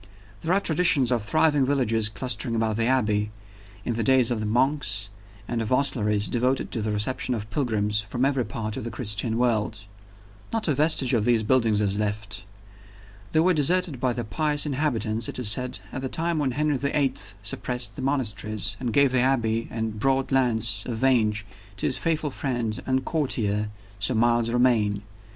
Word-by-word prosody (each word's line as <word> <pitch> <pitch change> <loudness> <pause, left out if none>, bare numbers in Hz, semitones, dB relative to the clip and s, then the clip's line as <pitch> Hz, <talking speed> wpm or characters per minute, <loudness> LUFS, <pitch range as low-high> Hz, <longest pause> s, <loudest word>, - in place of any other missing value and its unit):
There 165 - -2
are 190 - +4
traditions 160 -8 +2
of 120 -2 +1
thriving 150 +5 +2
villages 115 -6 +1
clustering 115 +1 -3
about 110 -1 0
the 115 0 +1
Abbey, 105 -5 +1 0.6
in 120 - -1
the 115 0 -1
days 130 0 +3
of 120 - -1
the 110 - -3
monks, 125 -4 0 0.4
and 120 -1 -2
of 110 - -3
hostleries 105 -6 +2
devoted 125 +2 0
to 115 - -2
the 110 - -2
reception 105 +4 -1
of 105 -2 -5
pilgrims 105 -4 0
from 120 +5 -2
every 135 -2 +1
part 110 -2 -5
of - - -5
the 120 - -4
Christian 110 -1 0
world. 110 -3 0 0.7
Not 225 -3 0
a 155 - +2
vestige 145 -2 +2
of 115 -4 +2
these 115 -1 +2
buildings 110 -3 +2
is 100 0 0
left. 105 -1 -3 0.9
They 160 - +3
were 180 +2 +3
deserted 165 -1 +2
by 125 -1 0
the 120 - -4
pious 145 +9 0
inhabitants, 120 -7 -1
it - - -4
is 120 -5 +6
said, 125 0 +2
at 130 - -5
the 130 - -3
time 165 +1 -1
when 140 -3 +1
Henry 150 +1 0
the 140 +3 -1
Eighth 100 -9 -1
suppressed 125 +4 -2
the - - -6
monasteries, 110 -6 -1
and 125 -3 -2
gave 140 +2 +4
the 130 - +2
Abbey 115 -3 +1
and 110 -1 -3
the - - -10
broad 135 +2 +1
lands 120 -4 +2
of 120 -3 -3
Vange 110 -5 +1 0.3
to - - -3
his - - +1
faithful 155 -3 -1
friend 120 -6 -3
and 130 0 0
courtier, 105 -9 0 0.3
Sir 110 +5 0
Miles 120 0 +2
Romayne. 115 -4 +2
120 Hz, 185 wpm, -25 LUFS, 110-135 Hz, 0.9 s, is